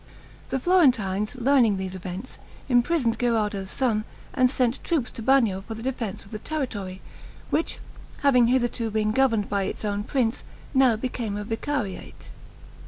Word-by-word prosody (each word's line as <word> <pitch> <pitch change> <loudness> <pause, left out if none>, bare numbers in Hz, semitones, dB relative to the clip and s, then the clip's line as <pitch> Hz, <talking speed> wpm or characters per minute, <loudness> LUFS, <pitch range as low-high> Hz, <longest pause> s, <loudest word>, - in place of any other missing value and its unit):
The 265 - 0
Florentines 250 - +2
learning 245 -5 +3
these 190 -1 -4
events, 185 +5 -7 0.3
imprisoned 245 -1 +2
Gherardo's 210 -5 0
son, 225 -4 0 0.3
and 255 -2 +4
sent 250 -1 0
troops 305 -8 0
to - - -8
Bagno 225 -6 +3
for 225 - -5
the 225 - -8
defense 230 -7 -3
of 195 - -17
the 215 - -5
territory, 205 -11 -4 0.5
which 325 - 0 0.5
having 250 -4 +5
hitherto 240 -2 +1
been 215 0 0
governed 225 -4 +2
by 200 -1 0
its 215 - -4
own 205 0 -1
prince, 245 0 0 0.3
now 260 -4 +5
became 225 -3 -3
a 210 - -3
vicariate. 225 -2 -4
230 Hz, 150 wpm, -25 LUFS, 205-260 Hz, 0.5 s, having